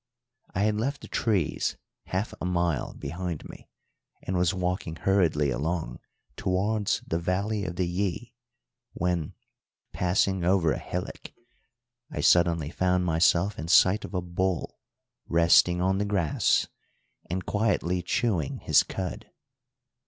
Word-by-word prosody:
I 95 - +1
had 105 0 +1
left 140 +5 -2
the - - -9
trees 100 -9 0 0.3
half 95 +5 -2
a - - -2
mile 85 -6 -1
behind 85 -2 -5
me, - - -13 0.5
and 95 - -3
was 90 -1 +2
walking 90 -3 -2
hurriedly 80 -5 +2
along 80 +6 -2 0.4
towards 100 +1 0
the 85 - -1
valley 100 +4 -1
of 90 - -4
the 90 - 0
Yí, 100 +6 -2 0.6
when, 90 -3 -2 0.6
passing 95 +1 +1
over 90 -3 +3
a - - -2
hillock, - - -6 0.8
I - - -6
suddenly 85 -3 +3
found 90 0 +1
myself 85 +4 +2
in 80 - -4
sight 95 +4 +5
of - - -7
a 90 - 0
bull 90 0 -2 0.5
resting 85 +1 +4
on 95 +1 +1
the 105 - 0
grass 95 -7 +2 0.6
and 90 +2 -3
quietly 100 -4 0
chewing 90 - -1
his - - +4
cud. 95 -2 -5
90 Hz, 130 wpm, -27 LUFS, 85-100 Hz, 0.8 s, sight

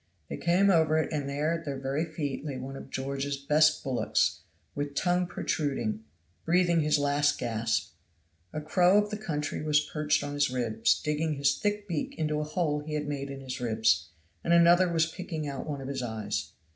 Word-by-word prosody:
They - - -4
came 185 +4 +3
over 160 -3 +3
it 160 - -1
and 145 -2 -2
there 150 +4 0
at 165 0 -3
their 140 -3 -4
very 135 +4 -1
feet 155 -4 -4
lay 140 -4 -4
one 130 +2 -6
of - - -9
George's 140 +1 -3
best 150 +2 +3
bullocks, 130 -3 +1 0.3
with 145 0 -4
tongue 180 +1 +1
protruded, 140 -10 -2 0.4
breathing 175 0 +3
his 150 -1 +3
last 145 0 +2
gasp. 115 -1 -1 0.6
A 155 - -4
crow 180 +5 +4
of 210 0 +2
the 210 - -2
country 155 -8 -3
was 150 -1 +3
perched 150 -1 +1
on 145 0 -4
his 145 -1 +2
ribs, 115 -3 +1
digging 150 0 -1
his 140 0 +2
thick 205 0 -2
beak 165 -5 -3
into 150 -1 0
a - - -1
hole 150 -1 0
he 150 +1 -5
had 150 -1 -2
made 140 -1 -3
in 135 0 -7
his 130 -1 -6
ribs, 110 -9 +2 0.3
and 170 - +2
another 170 +1 +6
was 165 -1 +3
picking 160 -2 -5
out 140 0 -5
one 145 -2 -4
of 135 - -6
his 135 -1 -3
eyes. 110 -3 -3
150 Hz, 195 wpm, -29 LUFS, 135-165 Hz, 0.6 s, another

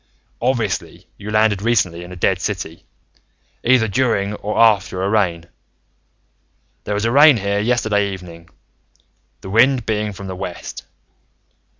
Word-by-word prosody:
Obviously, 100 -8 -2
you 105 +1 -7
landed 105 -2 +2
recently 95 -7 0
in 90 - -11
a - - -8
dead 90 +1 0
city, 90 -5 -5 0.8
either 120 -2 +3
during 105 -2 0
or 105 0 -4
after 100 -4 +3
a 95 - 0
rain. 90 -6 0 1.4
There 105 - -2
was 105 +2 -1
a 115 - +1
rain 145 0 +7
here 100 0 -1
yesterday 105 -3 +1
evening, 85 -3 -10 0.9
the 95 - -8
wind 125 +3 +3
being 105 -1 -1
from 100 0 -9
the 95 -1 -6
west. 90 -2 -7
105 Hz, 135 wpm, -19 LUFS, 95-110 Hz, 1.4 s, rain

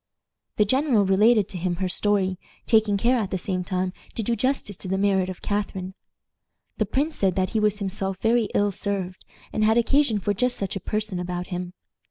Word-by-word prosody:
The 210 - +3
general 260 -2 +2
related 210 +2 +4
to 185 - -6
him 175 0 -1
her 185 +1 -1
story, 190 -1 +1 0.3
taking 220 -3 +3
care, 245 +5 +2
at 210 -5 -1
the 190 - -1
same 185 0 -2
time, 185 0 -2 0.2
to 225 - -2
do 235 +3 0
justice 245 -3 -1
to - - -7
the 190 +1 0
merit 195 -2 +2
of 185 - -8
Catharine. 195 -2 -2 0.9
The 215 - +1
prince 290 +8 0
said 190 -3 +1
that 185 -1 +1
he 225 - 0
was 210 -1 +2
himself 195 -1 -3
very 230 +1 +3
ill 205 0 +3
served, 190 -2 -3 0.3
and 215 - +1
had 220 +2 +4
occasion 245 -1 +3
for 205 +1 0
just 250 +5 +1
such 195 -1 -3
a - - -2
person 210 0 -3
about 180 0 -4
him. 180 0 -4
200 Hz, 205 wpm, -24 LUFS, 185-220 Hz, 0.9 s, related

